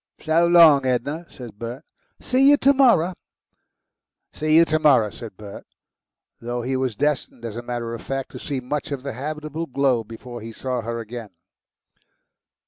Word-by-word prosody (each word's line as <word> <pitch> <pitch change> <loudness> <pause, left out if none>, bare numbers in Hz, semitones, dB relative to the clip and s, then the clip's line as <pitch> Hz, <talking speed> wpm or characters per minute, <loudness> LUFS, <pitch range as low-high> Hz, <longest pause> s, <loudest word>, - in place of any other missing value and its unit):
"So 165 +2 +3
long, 165 -5 +7
Edna," 140 +7 -2
said 115 -6 -11
Bert. 120 +5 -6 0.4
"See 265 +2 +3
you 290 - +6
to 280 0 +4
morrer." 230 - +4 1.2
"See 155 0 +1
you 165 +1 +7
to 155 -1 0
morrer," 130 -9 +4
said 110 -4 -10
Bert, 105 -2 -10 0.8
though 120 +1 -4
he 130 +2 -2
was 130 -4 -1
destined, 140 -3 -2
as 110 -2 -6
a 120 - -4
matter 120 -1 -4
of 115 - -6
fact, 135 -1 -4
to - - -9
see 140 -3 -4
much 145 +4 -4
of 135 -2 -4
the 140 - -4
habitable 155 +5 -5
globe 130 -4 0
before 120 +1 -9
he 115 +1 -8
saw 125 +1 -3
her 115 +1 -4
again. 115 -1 -7
130 Hz, 170 wpm, -23 LUFS, 115-155 Hz, 1.2 s, long